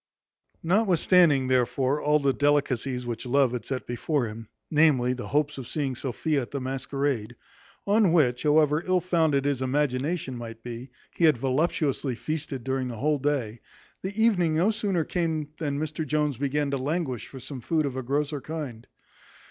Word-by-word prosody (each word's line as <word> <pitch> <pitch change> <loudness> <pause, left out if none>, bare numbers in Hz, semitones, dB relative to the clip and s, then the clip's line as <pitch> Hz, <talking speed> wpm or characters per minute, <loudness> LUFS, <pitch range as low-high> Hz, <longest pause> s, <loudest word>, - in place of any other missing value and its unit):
Notwithstanding, 175 - +4
therefore, 130 +3 +1
all 150 +1 +3
the 140 -2 +1
delicacies 135 -3 +1
which 120 +1 -4
love 135 0 +3
had 125 -1 -4
set 130 -2 -4
before 125 +3 -1
him, 110 0 -8 0.2
namely, 145 -5 +4
the 125 -1 -6
hopes 150 0 0
of 125 - -7
seeing 140 -4 -2
Sophia 140 +4 -1
at 120 - -7
the 140 - -4
masquerade; 130 -3 -2 0.5
on 205 -2 +4
which, 125 -8 +3
however 150 +1 +3
ill 185 0 +3
founded 160 -6 +1
his 140 -2 0
imagination 135 +2 -1
might 115 -1 -8
be, 120 +2 -7 0.2
he 170 - +2
had 155 -5 +5
voluptuously 135 0 0
feasted 135 +1 -4
during 130 0 -1
the 120 -2 -6
whole 150 +4 +1
day, 130 -6 -1 0.4
the 195 +3 -5
evening 180 -8 +3
no 180 +7 +3
sooner 200 -6 0
came 160 -3 -2
than 145 -3 -2
Mr 155 +1 -3
Jones 150 -2 0
began 140 +1 -1
to 140 - 0
languish 135 - -2
for 135 - -10
some 130 0 -8
food 155 +3 0
of 135 -2 -3
a 130 - -2
grosser 145 +3 -1
kind. 140 -8 -6
140 Hz, 170 wpm, -26 LUFS, 130-155 Hz, 0.5 s, had